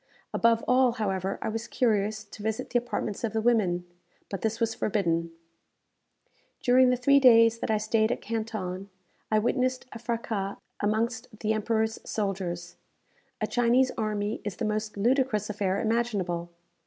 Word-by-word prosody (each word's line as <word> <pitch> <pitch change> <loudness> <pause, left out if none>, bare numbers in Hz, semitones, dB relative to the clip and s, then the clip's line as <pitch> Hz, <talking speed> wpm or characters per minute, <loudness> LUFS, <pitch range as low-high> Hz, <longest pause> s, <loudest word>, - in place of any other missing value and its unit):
Above 230 0 +3
all, 250 -1 +4
however, 195 -4 -2
I - - -1
was 225 +1 -4
curious 215 -3 +1
to 205 0 -12
visit 220 +1 -3
the 245 - +3
apartments 230 -3 -4
of 225 - -1
the 220 - +1
women; 200 -7 +2 0.5
but 195 - -4
this 225 +1 -1
was 225 -1 +1
forbidden. 170 -7 0 1.3
During 255 +1 +5
the 250 - +2
three 280 +3 +5
days 230 -3 +6
that - - -3
I 220 - +3
stayed 220 +1 +1
at - - -1
Canton, 205 -4 -4 0.4
I 215 - +3
witnessed 255 +3 0
a 230 - -8
fraças 225 -4 -3 0.2
amongst 225 +3 0
the 220 0 +1
Emperor's 220 +1 0
soldiers. 180 -4 -3 0.6
A - - +2
Chinese 245 +2 +3
army 210 -1 -2
is 205 -3 -4
the - - -3
most 215 0 -2
ludicrous 230 -2 +1
affair 195 -2 -1
imaginable. 205 -7 -1
220 Hz, 155 wpm, -28 LUFS, 205-235 Hz, 1.3 s, days